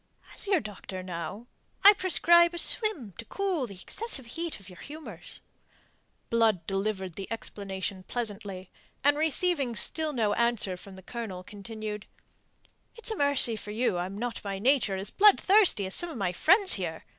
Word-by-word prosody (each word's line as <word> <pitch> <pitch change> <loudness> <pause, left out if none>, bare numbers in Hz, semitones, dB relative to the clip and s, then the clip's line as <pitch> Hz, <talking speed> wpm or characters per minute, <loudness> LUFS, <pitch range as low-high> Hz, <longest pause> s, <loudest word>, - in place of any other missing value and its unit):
"As - - -8
your 390 -3 +3
doctor, 195 -3 -8
now, 180 +4 -6 0.4
I 405 - +11
prescribe 345 -3 +4
a - - -5
swim 335 - +1
to 230 - -6
cool 365 - -2
the 195 -4 -10
excessive 420 - -4
heat 330 +6 -5
of 195 - -15
your 180 -2 -13
humours." 310 +2 -9 0.9
Blood 220 -7 +2
delivered 195 -1 -2
the 195 +4 -8
explanation 195 -3 -5
pleasantly, 200 -4 -5 0.3
and, 290 +1 +4
receiving 305 -4 0
still 315 +6 +3
no 220 -6 0
answer 235 -5 0
from 190 +1 -12
the 190 - -13
Colonel, 200 -5 -6
continued: 210 +1 -7 0.9
"It's 460 0 -3
a - - -2
mercy 285 - +5
for 210 - -8
you 215 -4 0
I'm 185 +3 -4
not 240 +1 -4
by 200 -1 -4
nature 240 -2 +2
as 190 +2 -2
bloodthirsty 395 - +4
as 190 - -5
some 345 - +2
of 310 - -7
my 195 -4 -1
friends 370 - +4
here. 170 -4 -3
225 Hz, 165 wpm, -28 LUFS, 195-315 Hz, 0.9 s, I